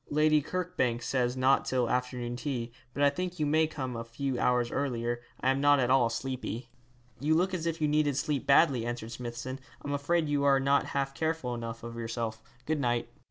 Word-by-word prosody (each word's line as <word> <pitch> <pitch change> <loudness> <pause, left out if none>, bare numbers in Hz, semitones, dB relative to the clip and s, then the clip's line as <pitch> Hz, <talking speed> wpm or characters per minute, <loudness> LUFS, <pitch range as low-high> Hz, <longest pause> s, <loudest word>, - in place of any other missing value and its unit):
'Lady 155 0 +4
Kirkbank 140 -9 -1
says 125 -1 0
not 130 +1 +4
till 125 -2 0
afternoon 125 0 -1
tea, 125 -3 -3 0.2
but 140 - -1
I 140 - +6
think 180 +1 -4
you 150 - +2
may 155 +2 +3
come 130 -5 -4
a 115 - -4
few 125 +2 -3
hours 125 -1 +2
earlier. 120 -3 -1 0.2
I 130 - +2
am 135 +1 0
not 145 0 +5
at 125 -1 +2
all 130 -3 +5
sleepy.' 125 0 -4 0.5
'You 150 +4 +2
look 185 +3 +2
as 170 -2 -2
if 165 0 -2
you 155 - +2
needed 150 -2 +2
sleep 140 0 -1
badly,' 140 -4 +5
answered 120 -1 -4
Smithson. 120 +2 -5 0.3
'I'm 145 - -2
afraid 155 +3 +1
you 145 -1 +1
are 140 -1 +5
not 140 +1 +2
half 135 0 0
careful 160 -5 -1
enough 115 -1 -6
of 115 0 -7
yourself. 115 -1 -3 0.2
Good 155 -1 0
night.' 120 -3 0
135 Hz, 205 wpm, -30 LUFS, 120-145 Hz, 0.5 s, I